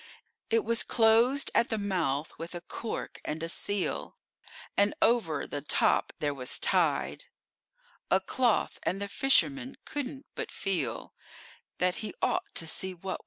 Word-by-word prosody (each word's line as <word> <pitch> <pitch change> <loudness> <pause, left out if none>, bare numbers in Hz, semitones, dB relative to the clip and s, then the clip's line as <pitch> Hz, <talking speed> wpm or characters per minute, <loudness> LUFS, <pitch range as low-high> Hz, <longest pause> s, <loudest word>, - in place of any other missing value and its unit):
It 455 -2 +2
was 230 0 +2
closed 235 +4 +4
at 235 - +3
the 220 - 0
mouth 165 -8 -1
with 165 +2 -6
a 175 - -5
cork 220 +5 -5
and 160 +2 -4
a - - -1
seal, 200 +3 -1 0.6
And 205 +1 +3
over 220 -10 +2
the 145 - -4
top 145 - +2
there 145 -1 -1
was 125 -2 -1
tied - - +1 0.8
A - - +5
cloth, 245 -4 +1
and 190 - -1
the 200 - -3
fisherman 270 +3 +2
couldn't 275 -1 -4
but - - -4
feel 195 -3 -2 0.6
That 180 0 +2
he 215 - -5
ought - - -1
to 165 - -2
see 185 +3 -2
what 170 - -28
was 190 - -2
inside. - - -5
200 Hz, 160 wpm, -30 LUFS, 165-240 Hz, 0.8 s, A